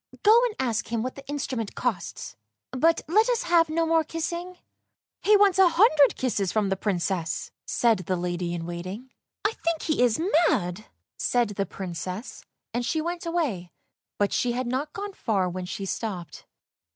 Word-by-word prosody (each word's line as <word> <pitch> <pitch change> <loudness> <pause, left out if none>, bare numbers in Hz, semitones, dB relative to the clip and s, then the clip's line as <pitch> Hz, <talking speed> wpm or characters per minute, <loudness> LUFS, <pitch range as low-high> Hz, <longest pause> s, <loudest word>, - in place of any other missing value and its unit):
Go 445 +3 +7
and 460 -4 -2
ask 235 -4 -1
him 230 -1 0
what 255 - -3
the 275 0 -12
instrument 265 -6 -3
costs, 220 -9 -3 0.4
but 320 +6 +3
let 430 +9 +4
us 485 -3 +1
have 340 -2 +4
no 330 +1 +1
more 325 0 +3
kissing." 340 +3 -4 0.3
" - - -61
He 420 0 +5
wants 395 -2 +4
a 375 -2 +7
hundred 325 - +5
kisses 205 -8 -1
from 210 -3 +1
the 195 - +1
Princess! 185 -4 -2
" - - -66
said 230 -4 +2
the 185 +1 -2
lady 175 0 -2
in 165 -1 -5
waiting. 185 +9 -6 0.2
" - - -43
I 415 - +4
think 335 -1 0
he 310 -5 0
is 245 0 +3 0.3
mad! 180 +3 -1 0.2
" - - -66
said 240 -3 +2
the 200 -1 -2
Princess, 185 +5 -6 0.3
and 240 +1 -1
she 315 +7 0
went 340 +2 -3
away, 270 - -2 0.4
but 205 -1 +1
she 245 -1 +1
had 255 +1 -2
not 265 +5 -2
gone 405 +3 -6
far 200 - 0
when 180 +1 -4
she 195 +2 -5
stopped. 185 -7 -5
245 Hz, 190 wpm, -26 LUFS, -, 0.4 s, Go